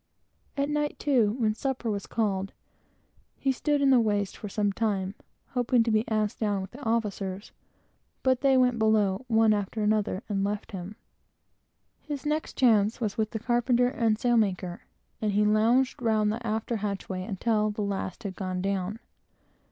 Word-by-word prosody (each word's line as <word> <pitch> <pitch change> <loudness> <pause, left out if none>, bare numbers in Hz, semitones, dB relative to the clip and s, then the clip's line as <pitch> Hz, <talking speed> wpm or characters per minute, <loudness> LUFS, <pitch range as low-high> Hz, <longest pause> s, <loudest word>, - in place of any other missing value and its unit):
At 280 0 +1
night, 295 0 -1
too, 240 -8 +2
when 220 -4 +1
supper 260 +1 -3
was 200 -2 -4
called, 195 -4 -1 0.8
he 270 - +1
stood 290 +2 0
in 275 - +5
the 255 - +6
waist 205 -3 0
for 210 - -7
some 205 0 0
time, 200 -3 -1 0.4
hoping 245 -1 +2
to 225 - 0
be 215 +1 +2
asked 215 -2 0
down 205 -3 0
with 190 0 -6
the 270 - -11
officers, 205 -4 -2 0.7
but 260 -1 +2
they 270 -1 +4
went 250 -2 +3
below, 215 0 +2
one 225 -1 +4
after 210 +1 -2
another, 210 -1 0
and 195 -2 -1
left 205 +1 -3
him. 190 +1 -7 1.0
His 290 -2 -6
next 305 +1 -2
chance 220 -4 +3
was 215 -4 -2
with 220 -1 0
the 220 - -4
carpenter 240 +2 +2
and 230 -4 +1
sail 240 +1 +2
maker, 185 -4 -1 0.4
and 210 -2 0
he 210 +1 +3
lounged 230 +5 +3
round 215 -2 +2
the 230 +2 -4
after 220 +2 -1
hatchway 200 -2 -3
until 215 +2 0
the 210 0 -3
last 200 +2 -3
had 195 -3 -5
gone 185 -1 -3
down. 195 +1 -2
215 Hz, 170 wpm, -27 LUFS, 200-240 Hz, 1.0 s, the